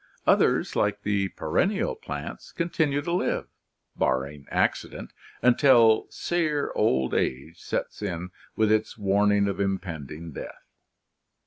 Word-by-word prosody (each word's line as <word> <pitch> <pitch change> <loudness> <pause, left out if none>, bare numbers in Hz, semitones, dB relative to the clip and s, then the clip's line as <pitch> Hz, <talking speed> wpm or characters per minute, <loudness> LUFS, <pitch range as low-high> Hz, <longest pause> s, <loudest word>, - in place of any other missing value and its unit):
Others, - - +3
like - - 0
the 100 -1 +1
perennial 195 - 0
plants, 445 - -7
con 170 0 -3
tinue 145 -3 +1
to 170 - -3
live, 180 - 0 0.5
barring 70 +2 -1
accident, - - -1 0.3
until 120 -3 +5
sere 155 -4 -1
old 65 0 +1
age 70 +6 -2
sets - - -4
in 90 +1 -4 0.2
with 110 -1 +2
its 110 0 +1
warning 100 0 +3
of 100 - -3
impending 85 -5 -4
death. - - -9
100 Hz, 120 wpm, -26 LUFS, -, 0.5 s, until